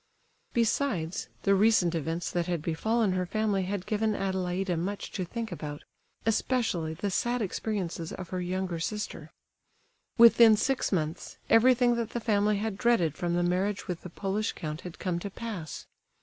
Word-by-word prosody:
Besides, 220 - 0 0.2
the 200 - +4
recent 195 -4 +4
events 165 +1 -2
that 175 -1 -1
had 170 -4 -2
befallen 220 +6 +1
her 185 -1 -1
family 205 -2 0
had 190 -1 -3
given 215 0 0
Adelaida 190 -1 -1
much 195 +5 -3
to 185 - -3
think 225 +5 -5
about, 145 -1 -6 0.4
especially 220 -8 0
the 195 +4 -2
sad 240 +6 0
experiences 190 -5 -3
of 185 -2 -7
her 185 -1 -3
younger 180 -1 -2
sister. 210 +5 -4 0.9
Within 230 -1 +8
six 270 +4 0
months, 160 -4 -2
everything 245 +1 +5
that 230 -1 -2
the 240 - -1
family 210 -2 +2
had 210 -1 -3
dreaded 195 - +2
from 175 +1 -1
the 175 - +2
marriage 190 +3 0
with 180 -2 -4
the 180 - -8
Polish 200 +5 -2
count 155 0 -5
had 180 -2 -9
come 175 -2 -2
to 200 - -5
pass. 200 -7 -6
195 Hz, 165 wpm, -29 LUFS, 175-220 Hz, 0.9 s, Within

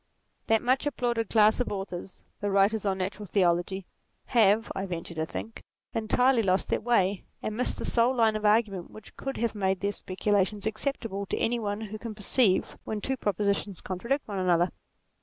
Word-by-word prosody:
That 225 -1 +3
much 260 +4 +2
applauded 240 -5 -1
class 215 -1 +5
of 245 - -1
authors, 190 -2 -6 0.2
the 205 - -1
writers 200 +2 +3
on 190 -1 +1
natural 195 +2 -4
theology, 180 0 +1 0.4
have, 220 -1 +3
I 195 0 -3
venture 170 -1 -5
to 160 -1 -2
think, 225 +6 -6 0.3
entirety 240 +3 +3
lost 190 -2 +1
their - - +1
way, 200 -5 +1 0.2
and 215 - -2
missed 250 - -1
the - - -4
sole 240 +2 +3
line 225 -3 +3
of 215 - -3
argument 210 -4 +2
which 215 0 -13
could 270 0 -5
have 235 -1 0
made 190 -3 0
their 200 0 +1
speculations 205 +1 0
acceptable 220 -3 -3
to - - -2
any 240 +1 +1
one 205 -1 -3
who 215 0 -6
can 225 -1 -6
perceive 210 -1 +2
when 215 - -3
two 265 +6 -1
propositions 200 -3 -1
contradict 235 +10 -2
one 200 -3 -3
another. 175 -1 +3
210 Hz, 180 wpm, -28 LUFS, 190-225 Hz, 0.4 s, class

